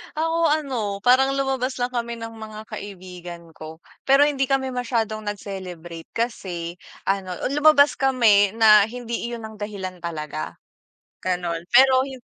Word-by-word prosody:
Ako 325 +1 0
ano, 260 -10 -1
parang 265 +3 +4
lumabas 270 -1 -1
lang 245 - +1
kami 235 -1 -3
ng 230 -1 -8
mga 215 0 -9
kaibigan 180 -5 -9
ko. 160 0 -11 0.2
Pero 275 +1 +5
hindi 290 -2 +3
kami 265 0 0
masyadong 230 -4 -2
nag-celebrate 180 -5 -7
kasi 180 -7 -3 0.3
ano, 195 -2 -1
ah, 180 - -3
lumabas 295 0 +5
kami 220 -7 +4
na 215 -2 +7
hindi 235 0 -5
iyon 235 -1 -5
ang 220 -1 -9
dahilan 200 -3 -6
talaga. 155 -3 -5 0.7
Gano'n. 175 -1 -2
Pero 260 +1 +5
yun 260 -3 -10
220 Hz, 140 wpm, -23 LUFS, 185-260 Hz, 0.7 s, na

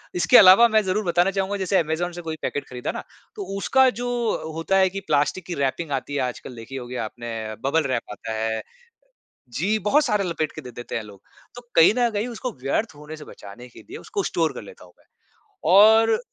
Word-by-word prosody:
इसके 180 +8 +5
अलावा 195 +5 +8
मैं 220 -1 +3
ज़रूर 205 +3 -1
बताना 175 +2 +2
चाहूँगा 195 +1 -2
जैसे 190 0 0
ऐमेज़ॉन 165 +2 -2
से 175 0 -8
कोई 160 -1 -5
पैकेट 145 - -3
खरीदा 125 -1 -4
ना - - -7 0.3
तो 415 - -5
उसका 265 +6 +4
जो 245 - -3 0.4
हो 160 - -6
होता 165 +4 0
है 190 -1 +4
कि 195 - -5
प्लास्टिक 150 +4 0
कि 180 - -4
रैपिंग 140 +3 -2
आती 135 +1 -3
है - - 0
आजकल 125 0 -5
देखी 115 +4 -10
होगी 125 -1 -7
आपने, 115 -2 -5
बबल 160 +4 +2
रैप 130 -4 -1
आता 110 +2 -6
है 110 0 -2 0.9
जी, 190 - -1
बहुत 245 +10 +2
सारे 210 -7 0
लपेट 160 -3 -2
के 155 - -8
दे 125 -3 -10
देते 120 +1 -7
हैं 115 - -2
लोग। 100 -2 -14 0.3
तो 245 - -9 0.2
कहीं 165 +5 +7
न 240 -1 +3
कहीं 215 +3 -2
उसको 245 +1 -5
व्यर्थ 155 +8 -1
होने 150 +2 -10
से 155 - -11
बचाने 110 +5 -12
के 120 - -15
लिए 390 - -8
उसको 415 -3 -4
स्टोर - - 0
कर - - -8
लेता 485 - -14
हूँ - - -19
मैं - - -28 0.7
और 220 +2 +6
165 Hz, 220 wpm, -23 LUFS, 130-205 Hz, 0.9 s, अलावा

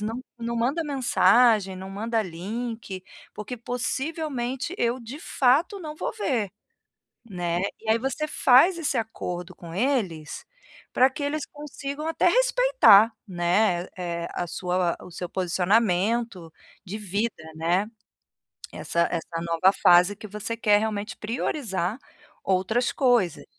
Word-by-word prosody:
não 225 +4 -3 0.2
não 235 0 -3
manda 265 +8 0
mensagem, 235 -7 +3
não 190 +1 -8
manda 225 +3 -1
link, 200 +2 -6 0.3
porque 215 +4 -6
possivelmente, 260 +3 -3
eu 240 +1 +1
de 245 +6 -9
fato 290 - +2
não 305 -2 -6
vou - - -3
ver", 245 - -1 0.8
né. 175 -2 -2 0.2
E 220 - -6
aí, 225 - +4
você 270 +4 -2
faz 295 +6 +5
esse 300 -5 -1
acordo 180 -6 -4
com 170 -1 -10
eles, 215 - -1 0.5
pra 260 +1 +5
que 280 +2 -6
eles 285 +1 -2
consigam 290 0 -6
até 325 - +2
respeitar, - - +5
né, 180 0 +1 0.5
a 175 - -2
sua 180 0 -1
o 180 - -12
seu 175 +1 -6
posicionamento 190 +1 0 0.3
de 195 +3 -5
vida, 205 -2 -3
né, 175 +6 +1 0.9
essa 170 0 0
essa 165 -1 -4
nova 170 +2 +3
fase 180 +3 +6
que 215 - -9
você 210 +3 -5
quer 210 -2 +4
realmente 210 -1 -3
priorizar 215 - -2 0.5
outras 195 +6 +1
coisas. 240 - +2
225 Hz, 125 wpm, -25 LUFS, 185-260 Hz, 0.9 s, fase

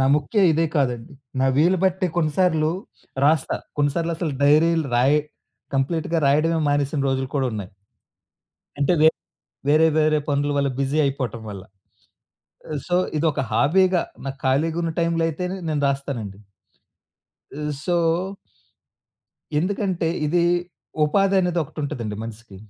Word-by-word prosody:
నా - - +3
ముఖ్య 150 +9 -2
ఇదే 165 +1 +2
కాదండి. 125 -5 -1 0.3
నా 135 - +3
వీలు 175 +6 +4
బట్టే 190 0 +1
కొన్నిసార్లు 160 -1 +2 0.6
రాస్తా. 155 -1 +2 0.2
కొన్నిసార్లసలు 160 +1 0
డైరీలు 155 +2 +4
రాయి 135 +5 +4 0.6
కంప్లీట్‌గా 160 +4 0
రాయడమే 160 +4 +2
మానేసిన 145 0 0
రోజులు 130 0 -1
కూడా 135 -2 +1
ఉన్నాయి. 105 -4 -5 1.1
అంటే, 140 +3 +2
వే 155 - +8 0.6
వేరే 155 +2 +5
వేరే 155 0 +3
పనుల 145 0 0
వల్ల 140 -1 +1
బిజీ 140 +2 0
అయిపోటం 130 -4 -3
వల్ల. 100 -2 -8 1.1
ఆహ్, 150 - -2
సో, 175 - +2 0.2
ఇదొక 155 -2 +1
హాబీగా 175 - +3 0.2
నాకు 135 0 -5
ఖాళీగున్న 165 +5 +1
టైంలో 165 0 +1
అయితేనే 180 +4 -3
నేను 150 -2 0
రాస్తానండి. 135 -8 -4 1.2
ఆహ్, 150 0 -2
సో 175 -1 +1 1.6
ఎందుకంటే, 185 -2 -1 0.2
ఇది 170 +3 +2 0.6
ఉపాధనేది 190 0 +2
ఒకటుంటదండి 130 -8 -5
మనిసికి. 115 -3 -10
150 Hz, 115 wpm, -23 LUFS, 135-165 Hz, 1.6 s, వే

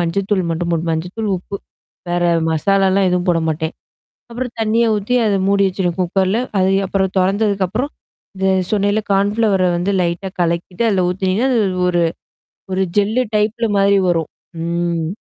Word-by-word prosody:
மஞ்சள்த்தூள் 185 +1 0
மட்டும் 170 +1 -2
போட்டு 165 0 -1
மஞ்சத்தூள், 180 +7 -3
உப்பு. 200 +3 -7 0.5
வேற 175 0 0 0.3
மசாலாலாம் 190 +3 +2
எதுவும் 180 0 0
போட 165 -1 +1
மாட்டேன். 160 +1 -3 0.6
அப்புறம் 245 0 -4
தண்ணிய 225 +2 +2
ஊத்தி 210 +5 -1
அத 200 -2 +2
மூடி 200 0 +3
வச்சுடுவேன் 180 -2 -2
குக்கர்ல. 190 +4 +1 0.2
அது 185 0 +3 0.2
அப்புறம் 190 0 0
தொறந்ததுக்கப்புறம், 200 - 0 0.5
இந்த 190 0 0 0.2
சொன்னன்ல 205 0 +1
கான்ஃப்ளவர 200 0 +2
வந்து 180 +3 0
லைட்டா 175 +2 -2
கலக்கிட்டு 175 +4 -1
அதில 190 -3 +1
ஊத்துனீங்கன்னா, 190 +7 0
அது 230 - +3 0.3
ஒரு 175 -1 +2 0.7
ஒரு 190 +1 0 0.2
ஜெல்லு 215 +5 +2
டைப்ல 215 +2 +1
மாாரி 200 0 +4
வரும். 165 -2 0 0.3
ம். 170 -1 -1
190 Hz, 140 wpm, -18 LUFS, 175-205 Hz, 0.7 s, மாாரி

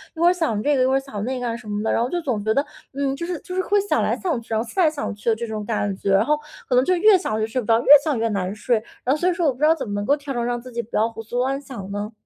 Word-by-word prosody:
一 - - -10
会 340 - +4
儿 - - +4
想 310 - -1
这 290 +3 +2
个 255 - +3
一 - - +3
会 265 - +2
儿 270 - +3
想 215 -7 -6
那 255 +2 -2
个 245 - -3
啊 230 - -2
什 235 -2 -11
么 205 0 -2
的， 220 - 0
然 - - +1
后 245 - -2
就 350 - -1
总 240 -9 -2
觉 220 +1 +1
得， 280 +5 +1 0.3
嗯， 275 0 -1
就 335 - -5
是 350 -2 -4
就 365 - -8
是 375 - +1
会 410 +2 +2
想 405 - 0
来 - - 0
想 335 -10 -1
去， 230 - -20
然 220 - +1
后 235 - -6
思 230 - -5
来 325 - +5
想 290 -6 -4
去 210 +3 -2
的 225 - +3
这 235 +1 -5
种 215 -1 -5
感 205 -2 -1
觉， 195 - -1
然 195 +3 +4
后 300 +2 +2 0.3
可 255 - +1
能 250 - +5
就 365 - +2
越 395 +3 +6
想 220 -12 -2
就 220 - 0
睡 250 +3 -2
不 210 - -10
着， 225 0 +4
越 - - -9 0.2
想 295 -5 0
越 230 - +1
难 195 -2 -2
睡。 215 +3 +1 0.3
然 260 +3 +2
后 - - -6
所 360 - +2
以 - - +1
说 340 0 -1
我 270 - +2
不 250 - -18
知 300 - +3
道 320 - +6
怎 265 -8 -5
么 205 - -4
能 205 0 -2
够 280 - +3
调 285 -1 -6
整 240 -2 -1
让 240 0 -1
自 255 - -11
己 235 0 -2
不 235 - -10
要 220 - +3
胡 225 - -8
思 235 +3 -9
乱 265 +2 0
想 230 -9 -8
呢？ 205 +2 -4
250 Hz, 410 characters per minute, -22 LUFS, 220-295 Hz, 0.3 s, 越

